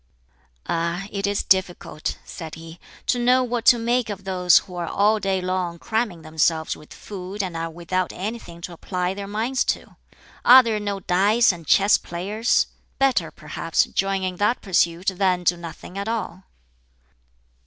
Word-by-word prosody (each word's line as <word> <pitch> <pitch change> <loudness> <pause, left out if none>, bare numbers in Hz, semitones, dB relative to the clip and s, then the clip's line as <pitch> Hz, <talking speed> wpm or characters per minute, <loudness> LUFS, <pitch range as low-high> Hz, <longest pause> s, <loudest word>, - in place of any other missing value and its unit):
"Ah, 170 +3 -1
it 200 0 -1
is 200 0 0
difficult," 180 -4 0
said 160 -2 -8
he, 165 +1 -11 0.3
"to 245 - +1
know 250 +1 +4
what 240 -1 -2
to 240 - +7
make 235 0 0
of 200 -1 -6
those 180 -2 +4
who 180 - -2
are 175 -1 -3
all 210 +4 +2
day 195 -2 0
long 180 -2 -2
cramming 215 -4 -2
themselves 160 0 0
with 150 - -16
food 195 0 -6
and 180 -3 -5
are 165 0 -3
without 175 +2 -2
anything 190 -4 -6
to 175 - -7
apply 180 +2 -2
their 200 0 -6
minds 225 +6 0
to! - - -3 0.5
Are 255 +1 +9
there 225 -3 -1
no 200 -1 -3
dice 200 +7 +3
and 170 -4 -10
chess 200 +6 +5
players? 205 +7 0 0.3
Better, 270 -1 +2
perhaps, - - -1
join 195 0 -1
in 185 -1 -3
that 210 +5 +1
pursuit 180 -1 +1
than 185 -2 +2
do 175 0 +3
nothing 170 +2 -9
at 200 - -4
all!" 205 -5 -4
190 Hz, 165 wpm, -23 LUFS, 175-210 Hz, 0.5 s, Are